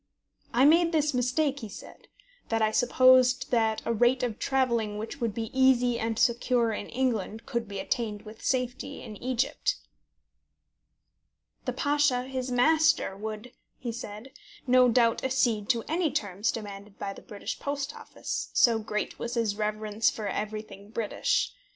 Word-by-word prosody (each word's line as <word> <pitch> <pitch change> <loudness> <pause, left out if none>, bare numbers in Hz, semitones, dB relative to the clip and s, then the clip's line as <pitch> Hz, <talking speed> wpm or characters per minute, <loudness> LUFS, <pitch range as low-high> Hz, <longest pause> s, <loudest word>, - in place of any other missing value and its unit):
I 250 +3 +4
made 335 +3 +5
this 305 -2 +2
mistake, 265 +3 +1
he 220 -5 -7
said, 195 - -12 0.4
that 225 - +1
I 215 -1 +2
supposed 255 +2 +4
that 225 -2 +1
a 230 - +1
rate 245 +3 +3
of 230 -3 -2
travelling 235 -6 0
which 225 +5 -6
would 230 -2 0
be 225 -1 -4
easy 250 -2 +3
and 225 -1 -2
secure 235 0 +2
in 205 - -5
England 230 -3 -2
could 235 -4 -3
be 200 -1 -6
attained 215 0 -2
with 220 0 -12
safety 255 +1 -2
in 215 - -8
Egypt. 255 +3 -1 1.9
"The - - -1
Pasha, 290 -4 +2
his 260 0 -4
master, 310 -2 +3
would," 215 +3 -6 0.3
he 240 - -4
said, 225 +2 -8 0.3
"no 255 -1 +5
doubt 230 -1 +3
accede 240 -5 +1
to 235 -3 +2
any 330 0 +1
terms 205 -7 -1
demanded 205 -2 -8
by 195 0 -4
the - - -12
British 205 -2 -6
Post 285 0 -3
Office, - - -5
so 230 -2 +4
great 210 -1 -4
was 235 +1 -4
his 225 -3 0
reverence 215 +1 0
for 215 -2 -5
everything 210 -1 -5
British. 230 - 0
235 Hz, 155 wpm, -28 LUFS, 215-260 Hz, 1.9 s, made